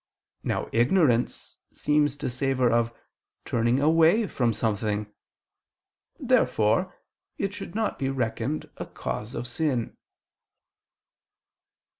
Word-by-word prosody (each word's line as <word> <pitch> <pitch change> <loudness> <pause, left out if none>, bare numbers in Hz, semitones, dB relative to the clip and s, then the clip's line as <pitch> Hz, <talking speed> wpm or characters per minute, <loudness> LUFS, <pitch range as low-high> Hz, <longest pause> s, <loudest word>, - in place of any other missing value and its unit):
Now - - -1
ignorance 125 0 +1 0.2
seems 145 -1 +1
to - - -3
savor 130 -1 +1
of 115 0 +2 0.5
turning 120 +2 +1
away 165 +8 +4
from 120 - 0
something. 105 -1 -1 1.1
Therefore 110 - +2 0.4
it 195 0 -2
should 190 - -8
not 220 -1 -1
be 135 - 0
reckoned 130 +2 -2
a - - -6
cause 105 +3 -5
of - - -4
sin. 125 -2 -1
130 Hz, 100 wpm, -26 LUFS, 115-155 Hz, 1.1 s, away